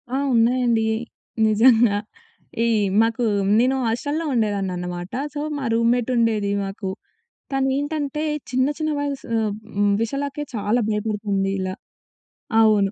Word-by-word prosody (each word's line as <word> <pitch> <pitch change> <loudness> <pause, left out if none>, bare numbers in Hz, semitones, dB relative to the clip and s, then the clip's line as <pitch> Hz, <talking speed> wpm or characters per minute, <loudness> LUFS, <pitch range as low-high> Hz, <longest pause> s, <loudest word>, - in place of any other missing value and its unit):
ఆ! - - +1 0.2
ఉన్నాయండి. 235 -1 +3 0.6
నిజంగా. 220 -1 +5 0.7
ఈ - - +2 0.3
మాకు 230 +1 +1 0.3
నేను 255 +2 +3
హాస్టల్‌లో 285 +8 -1
ఉండేదాన్ననమాట. 185 -5 -2 0.2
సో, 290 - -3 0.2
మా 275 - -4
రూమ్‌మేటుండేది 230 -3 +2
మాకు. 195 0 -5 0.6
తనేంటంటే 285 +2 -1 0.3
చిన్న 255 +1 +2
చిన్న 310 0 0
వయసు 285 -1 -3
ఆహ్, 215 -2 0 0.2
హ్మ్. 205 0 +3
విషయాలకే 280 +4 -2
చాలా 210 +3 +1
భయపడుతుంది 205 -2 -1
ఇలా. 185 0 -2 0.9
అవును. 210 -3 +4
230 Hz, 105 wpm, -22 LUFS, 205-265 Hz, 0.9 s, నిజంగా